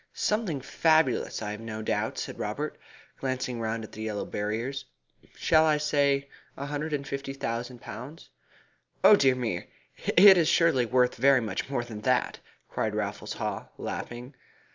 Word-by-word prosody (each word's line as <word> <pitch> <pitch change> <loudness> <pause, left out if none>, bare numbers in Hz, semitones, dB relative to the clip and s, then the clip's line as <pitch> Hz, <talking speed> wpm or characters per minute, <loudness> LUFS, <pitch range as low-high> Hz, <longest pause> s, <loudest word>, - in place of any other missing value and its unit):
"Something 210 -10 -1
fabulous, 155 -4 +2
I 105 - -3
have 105 - -6
no 110 -1 -6
doubt," - - -1
said - - -5
Robert, - - -3 0.4
glancing 130 -2 -2
round 110 0 -2
at 110 - -10
the 110 - -9
yellow 110 -2 -3
barriers. 115 +6 -3 0.5
"Shall 160 -1 +4
I 155 -1 +3
say 140 -2 +1 0.3
a 140 - -4
hundred 150 +2 -3
and 140 -2 -2
fifty 135 0 -4
thousand 120 -1 -4
pounds?" 140 +8 -9 0.7
"Oh 210 - +9
dear 135 -8 +4
me, 115 -9 -3 0.4
it 190 +1 +8
is 165 - +3
surely 135 -8 +3
worth 125 +1 +3
very 135 +2 +5
much 115 +2 -3
more 135 -3 -1
than 110 -3 -8
that," 125 +2 +1 0.3
cried - - -2
Raffles - - -3
Haw, - - -4
laughing. 120 +3 -6
130 Hz, 160 wpm, -28 LUFS, 115-145 Hz, 0.7 s, Oh